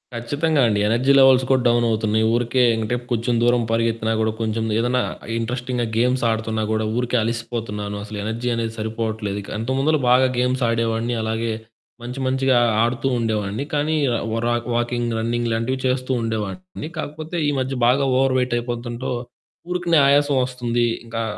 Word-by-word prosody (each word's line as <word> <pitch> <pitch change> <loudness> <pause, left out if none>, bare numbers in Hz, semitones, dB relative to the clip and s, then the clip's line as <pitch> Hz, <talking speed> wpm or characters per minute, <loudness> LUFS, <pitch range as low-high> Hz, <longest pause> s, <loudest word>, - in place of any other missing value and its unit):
ఖచ్చితంగా 145 +6 0
అండి. 105 -2 +1
Energy 125 +5 +3
levels 130 -1 +6
కూడా 130 -1 +3
డౌనవుతున్నాయి. 110 -2 +2
ఊరికే 120 +2 +1
ఎమ్మిటే 110 +1 -1 0.2
కొంచెం 120 +1 0
దూరం 120 0 +3
పరిగెత్తినా 115 -1 0
కూడా 110 0 +1
కొంచెం 110 0 -1
ఏదన్నా 125 +2 +1 0.4
ఇంట్రెస్టింగ్‌గా 120 +1 -2
గేమ్స్ 125 +2 +2
ఆడుతున్నా 110 0 -1
కూడా 110 0 0
ఊరికే 125 0 0
అలిసిపోతున్నాను. 115 -3 -4
అసలు 105 0 -7
ఎనర్జీ 115 +3 -2
అనేది 115 -1 -2
సరిపోవట్లేదు 110 -2 -3
ఇక. 100 - -12
ఇంతముందులో 135 +6 +1
బాగా 130 +1 +5
గేమ్స్ 125 +1 +1
ఆడేవాడిని, 115 +1 0
అలాగే 110 +1 -1 0.5
మంచి 125 +3 -6
మంచిగా 130 -1 +2 0.3
ఆడుతూ 120 +3 -1
ఉండేవాడిని. 110 0 -1
కానీ, 150 +2 +1 0.4
వ్ర 115 +1 -1 0.3
వాకింగ్, 120 0 -1
రన్నింగ్ 120 +1 -1
లాంటివి 115 +4 -1
చేస్తూ 130 0 -1
ఉండేవాడిని. 115 - -4
కాకపోతే 155 +2 -5
ఈ - - +3
మధ్య 130 +1 -2
బాగా 135 +3 +3
ఓవర్ 135 0 +2
వెయిట్ 125 -1 -1
అయిపోతుంటో 120 +1 -4 0.6
ఊరికనే 175 -3 +2
ఆయాసం 145 0 +3
వస్తుంది. 120 -2 -1 0.2
ఇంకా 115 0 -3
120 Hz, 145 wpm, -21 LUFS, 115-130 Hz, 0.6 s, levels